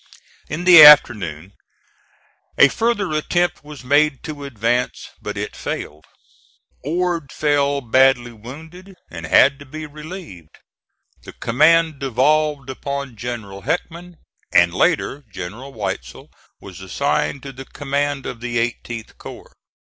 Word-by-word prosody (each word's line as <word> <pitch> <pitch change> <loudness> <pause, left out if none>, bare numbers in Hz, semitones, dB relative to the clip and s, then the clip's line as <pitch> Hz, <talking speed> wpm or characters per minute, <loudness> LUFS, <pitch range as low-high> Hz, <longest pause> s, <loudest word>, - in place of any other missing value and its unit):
In 155 +5 -4
the 180 -3 +9
afternoon 100 - +6 1.0
a 140 - +7
further 225 -4 -1
attempt 175 +3 -1
was 145 -4 -11
made 145 +1 +2
to 145 -2 -7
advance, 120 -1 -2
but - - -6
it - - -5
failed. 75 +1 -6 0.8
Ord 170 -1 -2
fell 145 -1 0
badly 125 0 +3
wounded, 160 - -12 0.2
and 85 -1 -7
had 135 - +4
to 140 - -12
be 155 +3 -7
relieved; 150 - -11 0.6
the - - -12
command 155 +5 +2
devolved 140 +2 +1
upon 140 -1 -5
General 110 -5 -7
Heckman, 170 - -4 0.4
and - - +4
later 145 +2 0
General 110 +10 -8
Weitzel 100 -5 -6 0.3
was 95 -1 -12
assigned 140 +8 -2
to 140 - -7
the 135 +1 -10
command 145 0 -3
of 115 - -6
the 120 0 -3
18th 115 -1 -4
corps. - - -11
140 Hz, 125 wpm, -20 LUFS, 120-155 Hz, 1.0 s, the